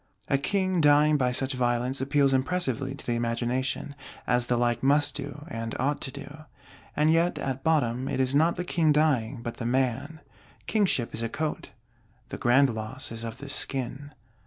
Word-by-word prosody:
A 140 - +2
King 185 +2 0
dying 150 +1 +5
by 125 -3 +1
such 135 +2 0
violence 125 +1 0
appeals 140 0 +2
impressively 135 -2 0
to - - -10
the 120 - 0
imagination; 120 +4 -1 0.3
as 125 -1 +1
the 120 - +1
like 120 -1 +1
must 145 +2 +3
do, 145 - -7
and 115 -6 -5
ought 140 +3 0
to 130 - -5
do. 145 +2 -10 0.5
And 155 +1 +3
yet 170 +2 +2
at 135 0 -3
bottom 130 -6 +1
it - - -2
is 130 0 +1
not 160 +4 +3
the 180 - -4
King 165 -3 +2
dying, 145 -7 +1
but 120 - -5
the 115 - -5
man! 130 +5 -1 0.5
Kingship 190 - +1
is 115 - -3
a 115 - -2
coat: 155 +5 -3 0.6
the - - -6
grand 130 +2 +4
loss 110 +4 -6
is 115 0 -5
of 115 -1 -6
the - - -9
skin. 135 +2 -3
135 Hz, 185 wpm, -27 LUFS, 120-150 Hz, 0.6 s, dying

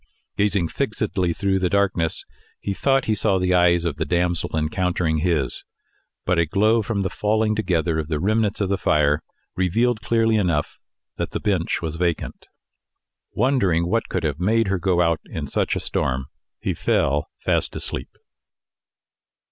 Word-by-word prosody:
Gazing 100 -5 +1
fixedly 110 -8 -1
through 95 +2 0
the 90 -1 +1
darkness, 95 -5 0 0.3
he 100 - -3
thought 135 +5 +1
he 110 - +1
saw 105 -2 +2
the 90 0 +1
eyes 85 -1 +4
of 75 -4 -2
the 80 - 0
damsel 85 0 0
encountering 80 0 0
his, 75 -6 0 0.6
but 90 -1 +2
a 85 - +2
glow 110 +7 +3
from 105 -2 -2
the 95 - -1
falling 110 +1 +1
together 85 -6 0
of 75 - -3
the 80 -2 -1
remnants 105 +2 +1
of 100 - 0
the 100 -1 0
fire 75 -1 +2 0.3
revealed 110 +5 +1
clearly 115 +1 +2
enough 85 -7 0 0.4
that - - -2
the - - -1
bench 95 -5 -1
was 80 0 -3
vacant. 85 -2 -2 0.9
Wondering 100 -11 +2
what 115 +5 0
could - - -2
have 75 -2 -1
made 110 +3 +2
her 95 -1 0
go 90 -1 +2
out 85 -1 +1
in - - -5
such - - -1
a - - -1
storm, 65 0 -1 0.3
he - - -1
fell 75 +1 0
fast - - 0
asleep. 65 - -5
90 Hz, 165 wpm, -22 LUFS, 85-105 Hz, 0.9 s, eyes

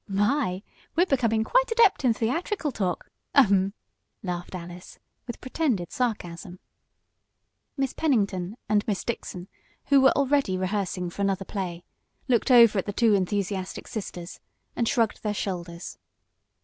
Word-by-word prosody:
"My! 205 -1 0 0.3
We're 345 +3 +4
becoming 230 -8 +1
quite - - +2
adept 455 -9 +4
in 250 - +4
theatrical 295 - -1
talk. 185 -7 -3 0.2
Ahem!" 200 -7 +4 0.5
laughed 180 -1 -4
Alice 175 0 -9 0.3
with 240 - -6
pretended 255 - -1
sarcasm. 180 -7 -3 1.2
Miss 270 -1 -1
Pennington 205 - 0
and 210 -1 +2
Miss 205 -3 -1
Dixon, 185 -6 -5 0.4
who 280 -1 +6
were 265 - +5
already 275 -8 +2
rehearsing 185 -2 -2
for 200 - -6
another 195 -1 0
play, 180 -4 -4 0.4
looked 245 -1 +2
over 235 -5 +7
at 190 - -4
the - - -1
two 225 0 +3
enthusiastic 195 -1 -1
sisters, 180 -5 -6 0.4
and 235 - 0
shrugged 230 -2 +1
their 210 -1 -2
shoulders. 175 -3 -5
205 Hz, 135 wpm, -26 LUFS, 185-255 Hz, 1.2 s, over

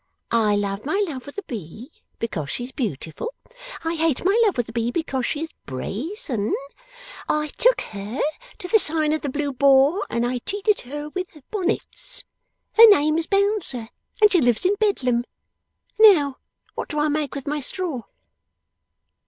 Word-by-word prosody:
I 220 -3 +3
love 200 0 -2
my 390 +8 0
love 265 -5 -7
with 285 - -10
a 405 - -4
B 225 - -8 0.3
because 165 -11 -4
she's 245 - -5
Beautiful; 220 - -4 0.5
I 325 0 -1
hate 325 -2 0
my 390 +3 +4
love 415 -9 +2
with 245 - 0
a - - -8
B 230 0 -1
because 265 -3 -2
she 295 - -2
is 325 - -5
Brazen; 230 - -2 0.7
I 300 0 0
took - - +3
her 205 +4 -6 0.4
to 360 - -6
the 440 +4 +5
sign 310 -3 +3
of 310 - -1
the 285 - -3
Blue 285 +1 -2
Boar, 275 +8 +4
and 235 0 0
I 250 0 -1
treated 405 - 0
her 295 +1 -5
with 365 -1 -6
Bonnets; - - 0 0.5
her 455 0 +11
name's 320 -3 +3
Bouncer, 395 - 0 0.3
and 425 -1 +6
she 355 - +4
lives 245 +3 +2
in 380 - +4
Bedlam. 255 - +1 0.8
Now, 315 -11 +6 0.3
what - - -5
do 300 - -4
I 300 +1 +2
make 295 -2 -1
with 275 - -6
my 295 +1 -1
straw? 305 -2 -3
295 Hz, 165 wpm, -23 LUFS, 240-370 Hz, 0.8 s, her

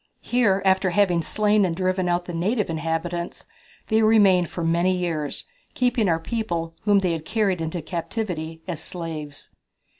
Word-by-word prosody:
Here, 210 -6 +2
after 190 0 +3
having 180 -2 +2
slain 210 +5 +2
and 175 -3 0
driven 185 0 0
out 175 0 0
the 175 - -6
native 200 +3 0
inhabitants, 165 +2 -3 0.4
they 220 0 +3
remained 200 -6 +5
for 170 - -4
many 170 +3 +2
years, 165 -5 -2 0.3
keeping 245 -5 +2
our 165 -1 +2
people, 170 -5 -3
whom 205 -2 +4
they 180 -2 +1
had 165 -2 -3
carried 195 -2 0
into 160 0 -3
captivity, 165 -2 -4
as 165 -4 -4
slaves." 160 -5 -7
180 Hz, 155 wpm, -24 LUFS, 165-205 Hz, 0.4 s, remained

